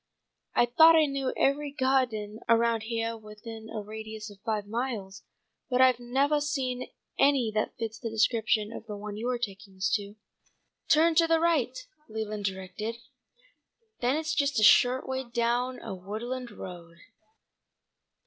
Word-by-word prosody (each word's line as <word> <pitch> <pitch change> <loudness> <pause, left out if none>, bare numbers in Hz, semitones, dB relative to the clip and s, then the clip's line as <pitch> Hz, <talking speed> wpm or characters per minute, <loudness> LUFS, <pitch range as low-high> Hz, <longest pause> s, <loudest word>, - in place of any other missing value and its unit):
I - - +5
thought 320 +7 +7
I 315 -1 +6
knew 275 -2 -1
every 285 +1 +1
gah'den 250 -6 0
around 230 -1 +3
heah 230 0 -2
within 220 +1 -10
a 215 -2 -5
radius 220 0 -7
of 200 - -15
five 215 -2 -1
miles, 210 -4 -4 0.5
but 250 -1 +1
I've 255 -2 +5
nevah 270 +5 +1
seen 260 -4 -2 0.3
any 270 -5 +4
that 215 - -1
fits 225 0 -4
the 235 - -4
description 220 -1 +1
of 230 - -9
the 210 -2 -5
one 205 0 -6
you're 245 +3 -1
taking 200 -4 -6
us 190 0 0
to." 205 0 -10 0.7
"Turn 325 +2 +5
to 330 +1 +4
the 330 0 +3
right," 305 -7 +1 0.3
Leland 215 -1 -4
directed. 195 +4 -4 1.0
"Then 250 +3 +1
it's 315 0 -1
just 280 -5 +1
a - - +2
short 250 +4 +5
way 265 0 -2
down 240 +1 -1
a 220 - -6
woodland 230 +7 -5
road. 170 -4 -10
230 Hz, 150 wpm, -28 LUFS, 215-260 Hz, 1.0 s, thought